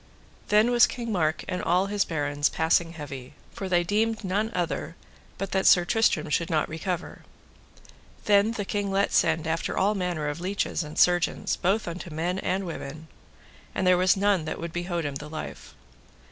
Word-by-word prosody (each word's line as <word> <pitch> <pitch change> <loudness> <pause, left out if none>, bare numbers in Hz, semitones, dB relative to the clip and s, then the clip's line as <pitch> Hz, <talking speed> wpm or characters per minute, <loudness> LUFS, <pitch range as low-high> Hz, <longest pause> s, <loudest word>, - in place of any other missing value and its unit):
Then 215 +3 +4
was 240 -2 +6
King 235 -2 -5
Mark 160 -5 0
and 180 - -2
all 180 +2 +2
his 200 0 0
barons 145 -2 0
passing 165 +1 +1
heavy, 140 -5 -8 0.2
for 195 - -5
they 175 -1 +3
deemed 220 +4 0
none 200 +4 0
other 170 -1 -2 0.4
but 195 0 -4
that 190 0 +2
Sir 175 -1 +6
Tristram 215 -6 +2
should 170 +3 0
not 155 -3 +1
recover. 175 +3 -4 1.0
Then 205 +2 +4
the 205 -3 -3
king 205 0 -2
let 195 +1 +1
send 160 -1 +2
after 165 +1 -2
all 200 +2 +3
manner 180 -6 -2
of 145 +3 -4
leeches 195 +1 -1
and 150 0 -9
surgeons, 175 -2 +2
both 195 +4 0
unto 170 +1 -6
men 170 +4 -2
and 195 +1 -1
women, 160 -2 -7 0.7
and 190 - 0
there 180 0 +6
was 185 +2 +3
none 195 -4 +2
that - - -4
would 170 0 -6
behote 175 -1 -2
him 145 - -2
the 150 +1 -9
life. 155 0 -8
180 Hz, 180 wpm, -26 LUFS, 160-200 Hz, 1.0 s, was